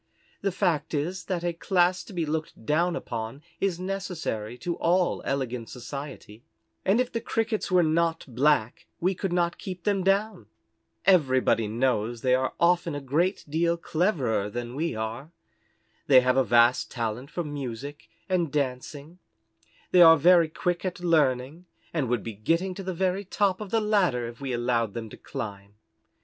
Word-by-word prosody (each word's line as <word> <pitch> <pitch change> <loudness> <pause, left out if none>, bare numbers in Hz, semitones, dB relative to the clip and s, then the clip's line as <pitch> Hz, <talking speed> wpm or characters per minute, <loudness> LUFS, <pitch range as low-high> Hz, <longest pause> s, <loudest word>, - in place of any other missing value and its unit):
The 195 - 0
fact 165 -3 0
is 175 +6 -2
that 175 -2 -2
a 175 -1 0
class 180 +1 +1
to - - -12
be 175 -4 -2
looked 155 -6 -4
down 170 +5 +1
upon 115 +1 -5 0.2
is 190 -3 0
necessary 180 - -4
to 175 +5 -3
all 175 +1 +1
elegant 125 -4 -2
society, 125 -3 -8 0.4
and 195 +5 +3
if 250 -1 0
the 230 - -2
Crickets 225 -2 -1
were 180 -2 +4
not 165 +1 +1
black 130 -2 +1
we 185 +3 +1
could 190 0 -3
not 175 -1 0
keep 185 -2 -7
them 200 -1 +1
down. 195 - 0 0.6
Everybody 130 - +3
knows 115 0 0
they 130 -1 +2
are 130 +1 0
often 170 -2 +2
a - - -3
great 155 +8 0
deal 170 +3 +1
cleverer 155 - 0
than 120 +2 -5
we 160 -2 -2
are. 110 +7 -5 0.8
They 130 -3 +7
have 125 0 +2
a 135 - +4
vast 120 +2 +4
talent 120 +2 -4
for 175 - -3
music 145 -1 -6 0.2
and 175 -5 0
dancing; 145 +4 -3 0.7
they 180 - +6
are 165 -1 +9
very 170 +1 +5
quick 175 +2 -2
at 180 -1 -4
learning, 155 -1 +1 0.3
and 145 -7 -1
would 120 -3 0
be 115 - -5
getting 165 - 0
to 195 - -7
the 185 -1 -4
very 190 +2 0
top 200 0 0
of 210 - -6
the 225 - +2
ladder 190 - +1
if 120 +3 -10
we 135 -2 -3
allowed 120 -3 0
them 115 -2 -6
to - - -10
climb. 100 -1 -7
155 Hz, 170 wpm, -26 LUFS, 125-180 Hz, 0.8 s, are